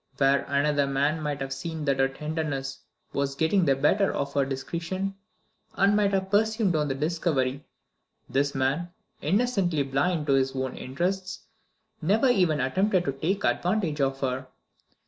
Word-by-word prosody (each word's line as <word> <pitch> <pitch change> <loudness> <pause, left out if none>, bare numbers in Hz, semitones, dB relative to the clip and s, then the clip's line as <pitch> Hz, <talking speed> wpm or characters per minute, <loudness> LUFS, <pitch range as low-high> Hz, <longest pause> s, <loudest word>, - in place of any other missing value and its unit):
Where 140 0 +3
another 140 0 +2
man 145 +3 +1
might 145 -2 -3
have 135 0 -3
seen 160 +2 -5
that 140 -2 +1
her 135 - +4
tenderness 140 -1 -4 0.3
was 140 -1 -1
getting 165 +5 +2
the 135 - +4
better 190 +9 +2
of 140 - -3
her 140 - +3
discretion, 170 +8 -3 0.6
and 200 +1 +4
might 205 -1 +3
have 190 0 -1
presumed 220 -3 +2
on 150 -1 +1
the 135 - -1
discovery, 145 -3 -1 0.6
this 140 +1 0
man, 140 +7 0 0.3
innocently 190 -4 +1
blind 150 +4 0
to 140 - +2
his 135 0 +1
own 130 -1 -2
interests, 185 +7 -3 0.6
never 215 - +3
even 180 -10 +3
attempted 185 +8 +1
to 140 - +1
take 170 +9 -2
advantage 175 -6 0
of 135 0 0
her. 130 0 -2
150 Hz, 155 wpm, -27 LUFS, 135-185 Hz, 0.6 s, her